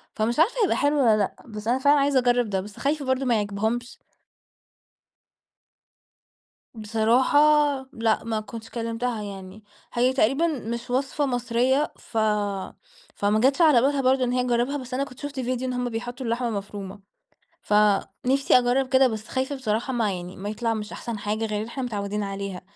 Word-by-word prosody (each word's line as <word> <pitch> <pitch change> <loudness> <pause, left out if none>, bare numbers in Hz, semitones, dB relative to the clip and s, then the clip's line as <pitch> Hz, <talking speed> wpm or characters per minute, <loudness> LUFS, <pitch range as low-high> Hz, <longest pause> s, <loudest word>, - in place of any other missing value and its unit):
فمش 230 +5 0
عارفة 350 +9 +4
هيبقى 395 - +2
حلو 290 +1 +2
والّا 225 -5 +4
لأ؟ 200 -2 -1
بس 210 -1 -8
أنا 250 +3 +2
فعلًا 285 +2 +4
عايزة 275 -1 +3
أجرّب 245 -2 +2
ده، 190 -2 -1
بس 205 +2 -11
خايفة 285 +1 -1
برضو 260 +1 0
ما 245 -2 +3
يعجبهمش. 220 +4 -2 2.8
بصراحة 225 +5 +2 0.6
لأ، 225 -1 0
ما 225 -1 -2
كنتش 220 +2 -9
كلمتها 230 0 -3
يعني. 195 +1 -9 0.3
هي 250 +2 +2
تقريبًا 270 +6 +2
مش 235 -7 -4
وصفة 270 +3 0
مصريّة، 250 +3 +1
ف 225 - -8 1.0
فما 205 +1 +1
جاتش 270 +6 +3
على 300 -8 +6
بالها 275 +2 +2
برضو 260 0 +3
إن 245 - 0
هي 250 0 +1
تجرّبها، 245 +3 0
بس 255 -2 -8
أنا 265 +2 0
كنت 270 -2 -10
شُفت 285 -2 -6
ڤيديو 255 0 -2
إن 255 -1 -2
هم 245 0 -2
بيحطوا 245 +3 -5
اللحمة 235 +1 -1
مفرومة، 200 -1 -6 0.6
فنفسي 210 +6 +2
أجرّب 250 +2 +1
كده، 260 0 +5
بس 220 -1 -6
خايفة 265 +2 -2
بصراحة 235 0 -2
ما 225 -5 0
يعني 180 +1 -8
ما 195 +2 -5
يطلع 225 +2 -1
مش 210 -1 -5
أحسن 235 -3 -5
حاجة 210 +2 -2
غير 210 -1 -2
اللي 220 - -5
إحنا 265 +3 -5
متعودين 210 -3 -3
عليها، 195 -2 -5
240 Hz, 170 wpm, -25 LUFS, 215-260 Hz, 2.8 s, على